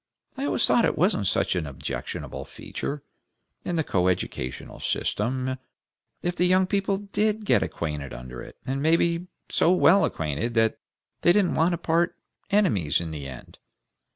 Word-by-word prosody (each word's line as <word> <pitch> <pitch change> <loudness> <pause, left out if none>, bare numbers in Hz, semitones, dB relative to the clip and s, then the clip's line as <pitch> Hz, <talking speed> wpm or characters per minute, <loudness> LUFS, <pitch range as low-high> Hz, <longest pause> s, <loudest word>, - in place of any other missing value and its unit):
I 275 +1 -3
always - - +3
thought 235 - +4
it - - +1
wasn't 180 - +2
such 95 - +1
an 85 -4 -1
objectionable 70 - -5
feature, 145 0 -6 0.6
in 175 - -2
the 160 - +1
coeducational 90 - -1
system, 130 +1 -1 0.7
if 175 0 -1
the 180 - +3
young 185 +1 +4
people 195 0 0
did 210 +2 -1
get - - +4
acquainted 75 -4 -3
under - - -8
it, - - -11
and 135 +1 -2
maybe 170 +2 +2 0.2
so 170 - +4
well 190 +2 +5
acquainted 80 +10 -2
that 115 -1 +2 0.4
they 175 - +5
didn't 195 -1 +3
want 170 +2 +3
to - - 0
part 170 +2 +1 0.3
enemies 105 - +2
in 85 -2 -5
the 75 -3 -6
end. 65 -2 -11
155 Hz, 155 wpm, -26 LUFS, -, 0.7 s, well